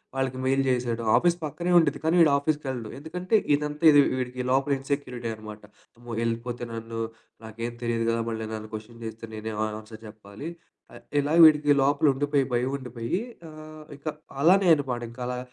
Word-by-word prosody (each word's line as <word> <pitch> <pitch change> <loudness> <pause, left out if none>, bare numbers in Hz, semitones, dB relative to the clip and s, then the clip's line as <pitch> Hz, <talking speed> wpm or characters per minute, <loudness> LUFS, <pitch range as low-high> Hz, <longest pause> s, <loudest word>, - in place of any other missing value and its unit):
వాళ్ళకి 130 -1 -1
మెయిల్ 135 +1 +2
జేశాడు. 120 -2 0
ఆఫీస్ 175 0 +2
పక్కనే 170 +4 -2
ఉండిద్ది. 160 -5 +3
కానీ 160 +2 +3
వీడు 155 - +6
ఆఫీస్‌కెళ్ళడు. 140 -6 -2
ఎందుకంటే, 180 +7 -2 0.2
ఇదంతా 150 +2 -3
ఇది 145 - +7
వి - - +1
వీడికి 125 0 -3
లోపల 135 +2 +2
ఇన్సెక్యూరిటీ 130 -4 -3
అనమాట. 110 -1 -10 0.4
అమ్మో! 120 0 -11
ఎళిపోతే 120 +1 -3
నన్ను 115 0 -6 0.5
నాకేం 115 +2 -5
తెలియదు 115 -1 0
కదా. 115 - +1
మళ్ళీ 110 -1 -4
నన్ను 110 0 -6
కొషన్ 115 +2 -10
జేస్తే 110 0 -7
నేనే 110 +1 -5
అని 110 - -5
ఆన్సర్ 110 0 -12
చెప్పాలి. 105 +7 -9 0.4
ఆహ్, - - -12 0.2
ఇలా 150 +3 0
వీడికి 150 -2 +6
లోపలుండిపోయి 145 -1 +2
భయం 125 +2 +1
ఉండిపోయి 125 - -3 0.3
ఆహ్, 155 0 -11
ఇక - - -33 0.4
అలానే 185 +2 +5
అనమాట 130 -5 -3
ఇంకలా 125 0 -4
130 Hz, 160 wpm, -26 LUFS, 115-150 Hz, 0.5 s, ఇది